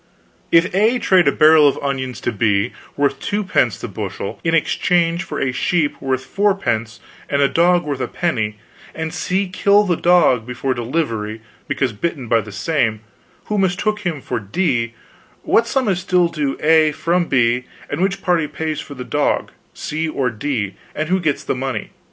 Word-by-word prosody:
"If 170 +3 +4
A 220 +6 +3
trade 185 -6 +3
a - - +6
barrel 155 -1 +6
of 140 - +1
onions 130 -3 -3
to - - -1
B, 105 -2 +1 0.2
worth 140 -1 +1
2 205 +1 -2
pence 130 - +1
the - - -6
bushel, 100 - -5
in 165 0 +2
exchange 170 +1 +1
for - - -5
a 135 - 0
sheep 150 +3 0
worth 130 -1 -1
4 200 0 +1
pence 115 - -2 0.3
and 140 - +1
a - - +5
dog 175 +3 +3
worth 145 -3 -3
a - - -1
penny, 110 -12 -2 0.4
and 160 -1 -4
C 190 +2 -1
kill 200 +3 +3
the 180 -4 +1
dog 170 -9 +4
before 125 +2 -2
delivery, 115 -4 -2 0.3
because 135 -4 -1
bitten 135 +2 -3
by 115 0 +3
the 110 - -10
same, 110 -1 0 0.4
who 210 -1 -1
mistook 195 +3 0
him 175 -8 -3
for - - -3
D, 115 - -1 0.5
what 230 +1 +3
sum 260 0 0
is 190 -3 +1
still 180 -2 +2
due 145 -5 -2
to - - -7
A 160 -1 +5
from 170 +3 0
B, 125 -1 +2 0.2
and 145 +4 -3
which 195 0 0
party 175 -4 +2
pays 155 0 -3
for 140 - -8
the 125 - -6
dog, 145 +3 0 0.2
C 160 +1 -3
or 130 -5 -1
D, 110 -4 -2 0.2
and 155 +1 -2
who 190 +1 +2
gets 155 -5 -1
the - - -1
money? 130 -3 -4
150 Hz, 185 wpm, -19 LUFS, 125-180 Hz, 0.5 s, a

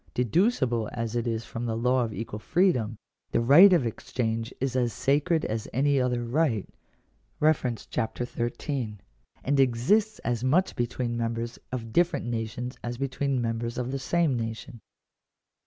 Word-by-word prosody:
Deducible 125 - +1
as 115 -1 -3
it 120 0 -1
is 115 -1 -2
from 120 +1 -5
the 110 -1 -1
law 125 +2 +2
of 115 - -3
equal 105 0 -5
freedom, 125 - +1 0.3
the - - +1
right 145 +12 +8
of 170 -8 +4
exchange 115 0 -2
is 130 -1 -1
'as 120 -2 +1
sacred 150 +4 +1
as 110 0 -3
any 140 +1 +2
other 125 -1 0
right 120 - +1 0.8
(Chap. 125 -6 0
XIII.), 120 -1 -3 0.5
and 140 +1 +1
exists 140 - +3
as 120 -1 -1
much 165 +9 +2
between 120 0 -2
members 115 0 -3
of 115 -3 -5
different 170 -5 +2
nations 120 +2 -4
as 120 0 -4
between 135 0 -1
members 115 +1 -2
of 125 0 -2
the 135 - -2
same 165 0 +1
nation. 115 +2 -5
120 Hz, 150 wpm, -27 LUFS, 115-140 Hz, 0.8 s, right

